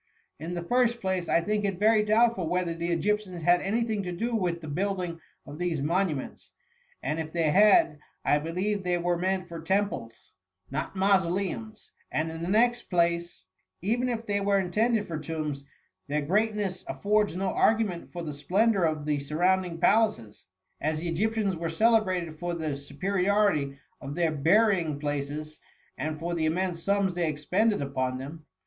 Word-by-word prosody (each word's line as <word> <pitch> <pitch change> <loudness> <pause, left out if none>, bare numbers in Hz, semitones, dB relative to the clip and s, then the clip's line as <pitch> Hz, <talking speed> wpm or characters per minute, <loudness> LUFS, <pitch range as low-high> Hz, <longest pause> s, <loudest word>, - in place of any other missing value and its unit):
In 165 +4 -5
the 175 - -3
first 240 +3 +2
place, 190 -2 -2
I 170 - +4
think 210 +4 -1
it 195 -3 -1
very 215 +2 +4
doubtful 215 -4 +2
whether 180 -1 0
the 165 +1 -3
Egyptians 185 -1 -1
had 175 +2 +4
any 220 +5 0
thing 220 -3 -1
to 180 -2 -4
do 230 +7 -2
with 175 -5 0
the 160 - -9
build 190 +6 -1
ing 170 -1 -5 0.3
of 145 +3 -9
these 175 -4 -1
monuments; 160 -1 -2 0.5
and 150 +4 -1
if 160 -1 -4
they 165 -2 +1
had, 195 -5 +5 0.3
I 145 - +4
believe 185 +6 -2
they 180 -1 +1
were 175 0 0
meant 185 +1 -1
for 170 -2 -7
temples, 165 - -2 0.4
not 155 +7 -3
mauso 190 -2 +3
leums; 200 +4 -4 0.2
and 160 +1 -1
in 165 0 -7
the 170 - -3
next 240 +4 +2
place, 170 -1 0 0.4
even 240 +5 +1
if 230 -1 -3
they 205 -1 0
were 200 0 +2
intended 210 +3 +1
for 160 -2 -4
tombs, 150 -2 -4 0.4
their 150 +1 -1
greatness 205 +2 0
af - - -7
fords 210 -3 +2
no 190 +1 -1
argument 215 -6 +1
for 175 -1 -5
the 150 -2 -4
splendour 195 +6 +2
of 155 -2 -1
the 150 -1 0
sur 140 +2 -5
rounding 180 -1 +2
palaces; 195 - +1 0.3
as 155 +1 0
the 170 +2 -3
Egyptians 210 +2 0
were 165 0 -3
cele 225 +6 +4
brated 175 -5 -3
for 175 0 -2
the 155 -4 -2
superiority 180 0 0 0.2
of 140 +1 -6
their 170 -2 +1
burying 170 0 +3
places, 145 +1 -4 0.4
and 155 +3 -4
for 170 +2 -3
the 160 -2 0
immense 175 +1 -1
sums 200 0 +1
they 175 -2 0
expended 180 +7 +1
upon 130 -2 -2
them. 150 +4 -9
175 Hz, 180 wpm, -28 LUFS, 155-205 Hz, 0.5 s, had